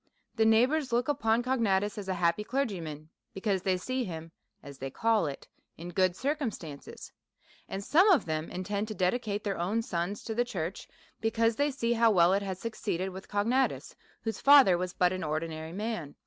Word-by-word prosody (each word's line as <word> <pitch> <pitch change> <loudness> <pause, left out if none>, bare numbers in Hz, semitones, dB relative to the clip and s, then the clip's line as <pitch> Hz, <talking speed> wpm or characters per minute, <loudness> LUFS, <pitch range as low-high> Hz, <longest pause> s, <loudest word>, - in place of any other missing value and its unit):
The 220 -2 +3
neighbours 255 +5 +3
look 240 +3 +1
upon 230 -4 +1
Cognatus 210 -6 +1
as 205 -2 -6
a 190 - 0
happy 170 +3 +1
clergyman, 175 - -3 0.3
because 195 -1 0
they 185 0 +1
see 255 +7 -2
him 165 -4 -7 0.3
(as 140 -1 -11
they 135 - -4
call 220 +3 +1
it) 140 - -7 0.3
in 170 +2 -7
good 185 0 +1
circumstances; 230 - -4 0.6
and 195 - -4
some 345 - +5
of 360 -7 +4
them 155 -1 -3
intend 200 +3 -3
todedi 210 +1 0
iCate 210 -3 -4
their 200 -4 -2
own 205 +7 0
sons 195 -2 -3
to 225 - -4
the 240 +2 +2
church, 185 -6 -5 0.3
because 225 0 +1
they 285 +1 +2
see 235 -4 0
how 230 0 +4
well 180 -3 +5
it 200 - +2
has 190 -2 -4
succeeded 190 -4 -3
with 190 +1 -9
Cognatus, 235 +6 0 0.3
whose 225 -1 -3
fa 285 0 +9
ther 185 - +4
was 180 +1 -2
but 180 +1 +2
an 185 - -4
ordinary 160 +1 -3
man. 195 -6 -4
200 Hz, 190 wpm, -29 LUFS, 175-230 Hz, 0.6 s, fa